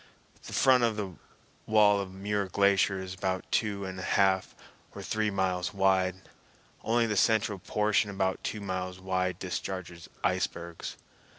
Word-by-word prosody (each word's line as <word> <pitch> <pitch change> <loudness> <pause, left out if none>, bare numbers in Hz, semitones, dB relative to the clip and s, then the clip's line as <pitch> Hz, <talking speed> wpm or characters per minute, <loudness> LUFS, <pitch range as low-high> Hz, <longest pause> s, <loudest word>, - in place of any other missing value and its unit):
The - - -8
front 130 -2 +5 0.8
wall 105 -2 +5
of 95 -1 -4
the 95 - -12
Muir 100 0 -1
Glacier 100 0 +3
is 95 -1 -6
about 95 0 -2
two 100 -3 0
and 95 0 -6
a - - -5
half 95 -1 +2 0.4
or - - -7
three 110 0 0
miles 95 -2 -1
wide. 95 -1 +1 0.6
Only 115 +1 +2
the 105 -2 -1
central 105 -2 +2
portion 105 +2 +1
about 95 -1 -1
two 105 - -3
miles 95 -1 -4
wide 95 -1 -1
discharges 90 -2 -5
icebergs. 85 0 -2
95 Hz, 140 wpm, -29 LUFS, 95-105 Hz, 0.8 s, front